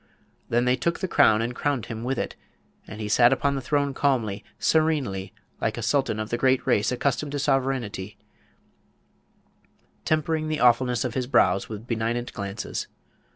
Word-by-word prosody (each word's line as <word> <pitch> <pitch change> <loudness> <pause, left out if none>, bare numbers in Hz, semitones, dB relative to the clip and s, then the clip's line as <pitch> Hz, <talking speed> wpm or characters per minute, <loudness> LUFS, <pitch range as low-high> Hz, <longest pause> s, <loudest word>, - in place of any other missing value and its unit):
Then 120 +1 +2
they 125 0 +3
took 170 +7 -1
the 190 - -2
crown 115 -10 +4
and 120 +2 -3
crowned 140 -4 -1
him 115 0 -6
with 130 +2 -1
it; - - -3 0.5
and 110 - -9
he 105 - -3
sat 120 +3 +5
upon 140 0 +1
the 135 - -2
throne 140 +1 0
calmly, 115 -8 0
serenely, 145 -12 +1 0.3
like - - -1
a - - -4
Sultan 110 - +1
of 110 0 -4
the 120 - -1
great 130 0 +2
race 105 - +2
accustomed 140 +3 -1
to - - -1
sovereignty, 130 -8 -1 1.9
tempering 155 0 0
the 155 -1 -2
awfulness 125 0 +3
of 125 - -3
his 125 -1 -2
brows 95 -7 +3
with 110 0 -7
benignant 120 +1 -2
glances. 100 0 -4
125 Hz, 165 wpm, -25 LUFS, 110-140 Hz, 1.9 s, sat